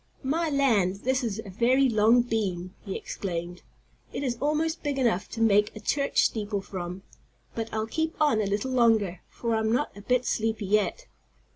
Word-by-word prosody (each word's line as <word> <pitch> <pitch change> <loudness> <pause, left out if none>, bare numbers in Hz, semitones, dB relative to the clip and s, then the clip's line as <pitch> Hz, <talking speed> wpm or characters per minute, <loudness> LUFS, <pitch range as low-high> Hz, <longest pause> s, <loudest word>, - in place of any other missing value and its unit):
"My 320 +5 0
land, 215 -10 +2
this 260 +1 +1
is 220 -4 -2
a 195 - -8
very 250 +7 +3
long 230 +1 +4
beam," 190 -6 -2
he 195 -3 -5
exclaimed. 175 -2 -5 0.5
"It - - -4
is 250 -3 -1
almost 310 +3 0
big 290 -2 -2
enough 230 -7 +1
to 225 - -5
make 210 -1 +3
a - - -7
church 280 +6 +1
steeple 205 -2 -1
from. 185 -1 -6 0.5
But 225 -1 -4
I'll 220 0 -1
keep 320 +8 -2
on 295 -8 +3
a 205 - -1
little 205 +6 -1
longer, 220 -8 +2
for 235 -1 -3
I'm 220 0 +1
not 245 +1 0
a 200 - -10
bit 250 +3 +1
sleepy 220 -2 -1
yet." 210 - +1
225 Hz, 180 wpm, -27 LUFS, 200-260 Hz, 0.5 s, long